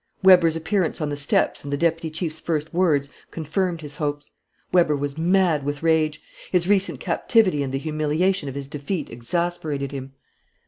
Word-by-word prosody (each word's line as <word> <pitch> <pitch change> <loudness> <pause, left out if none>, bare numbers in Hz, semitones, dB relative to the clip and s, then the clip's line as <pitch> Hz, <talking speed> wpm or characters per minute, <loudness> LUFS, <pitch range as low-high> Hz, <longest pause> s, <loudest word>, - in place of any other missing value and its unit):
Weber's 180 -4 +6
appearance 175 +2 -1
on 150 -2 -1
the 145 - -2
steps 145 0 0
and 140 - -6
the 145 - 0
deputy 165 +1 0
chief's 155 0 -4
first 155 -1 -2
words 155 -6 +2 0.2
confirmed 170 +2 -2
his 145 -1 -9
hopes. 145 -1 -3 0.4
Weber 170 -4 +4
was 140 0 -3
mad 170 -2 +2
with 145 +2 -4
rage. 155 -2 +2 0.3
His 180 -2 +2
recent 200 -1 +1
captivity 195 - +2
and 135 -2 -2
the 135 - -1
humiliation 155 +3 0
of 135 - -8
his 140 -1 -5
defeat 150 +3 -4
exasperated 145 +2 -2
him. 135 -1 -7
155 Hz, 170 wpm, -23 LUFS, 145-175 Hz, 0.4 s, Weber's